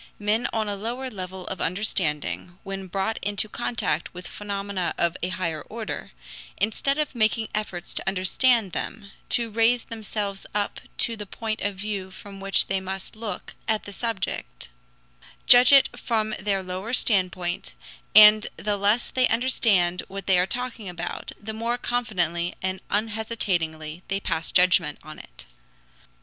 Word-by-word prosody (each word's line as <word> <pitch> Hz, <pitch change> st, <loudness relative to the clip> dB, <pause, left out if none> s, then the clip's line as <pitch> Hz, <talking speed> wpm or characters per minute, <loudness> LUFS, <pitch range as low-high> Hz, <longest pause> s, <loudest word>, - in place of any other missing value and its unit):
Men 210 Hz, +3 st, +1 dB
on 220 Hz, -1 st, -1 dB
a 205 Hz, -, -2 dB
lower 245 Hz, +6 st, -4 dB
level 185 Hz, -2 st, -7 dB
of 190 Hz, -, -5 dB
understanding, 180 Hz, -2 st, -1 dB
when 195 Hz, -1 st, -6 dB
brought 195 Hz, +4 st, -2 dB
into 205 Hz, +1 st, 0 dB
contact 210 Hz, -7 st, -2 dB
with 180 Hz, 0 st, -8 dB
phenomena 200 Hz, -3 st, -3 dB
of 170 Hz, -1 st, +2 dB
a 180 Hz, -, -1 dB
higher 170 Hz, -4 st, -2 dB
order, 225 Hz, 0 st, -5 dB, 0.5 s
instead 250 Hz, +7 st, 0 dB
of 305 Hz, -2 st, -1 dB
making 220 Hz, -1 st, +1 dB
efforts 210 Hz, -5 st, -3 dB
to -, -, 0 dB
understand 195 Hz, +3 st, +3 dB
them, 200 Hz, +2 st, -5 dB, 0.2 s
to 230 Hz, -2 st, +1 dB
raise 230 Hz, +2 st, +3 dB
themselves 210 Hz, -3 st, -4 dB
up 205 Hz, -1 st, -1 dB, 0.2 s
to 230 Hz, -, +5 dB
the 210 Hz, -2 st, -7 dB
point 220 Hz, +2 st, -4 dB
of 205 Hz, -1 st, -1 dB
view 200 Hz, -1 st, -4 dB
from 195 Hz, +1 st, -11 dB
which 195 Hz, 0 st, +3 dB
they 195 Hz, 0 st, 0 dB
must 190 Hz, +2 st, -6 dB
look 215 Hz, -4 st, -6 dB
at 220 Hz, -1 st, +1 dB
the 205 Hz, -, -9 dB
subject, 230 Hz, +2 st, -4 dB, 0.8 s
judge 250 Hz, 0 st, +8 dB
it 275 Hz, -1 st, +8 dB
from 220 Hz, -3 st, -1 dB
their 195 Hz, -1 st, 0 dB
lower 185 Hz, +6 st, -4 dB
standpoint, 180 Hz, -, +1 dB, 0.4 s
and 215 Hz, 0 st, +9 dB
the 205 Hz, 0 st, -1 dB
less 205 Hz, +4 st, +2 dB
they 255 Hz, -1 st, +3 dB
understand 215 Hz, -7 st, +3 dB
what 195 Hz, -1 st, -6 dB
they 190 Hz, -2 st, +5 dB
are 180 Hz, -, +2 dB
talking 240 Hz, -3 st, -4 dB
about, 175 Hz, -1 st, -5 dB
the 220 Hz, +1 st, -6 dB
more 230 Hz, +2 st, -1 dB
confidently 175 Hz, -9 st, -1 dB
and 190 Hz, 0 st, -2 dB
unhesitatingly 190 Hz, -8 st, -1 dB
they 195 Hz, 0 st, -1 dB
pass 165 Hz, -4 st, -2 dB
judgment 180 Hz, -4 st, +4 dB
on 155 Hz, 0 st, -10 dB
it. -, -, -13 dB
200 Hz, 155 wpm, -25 LUFS, 185-225 Hz, 0.8 s, and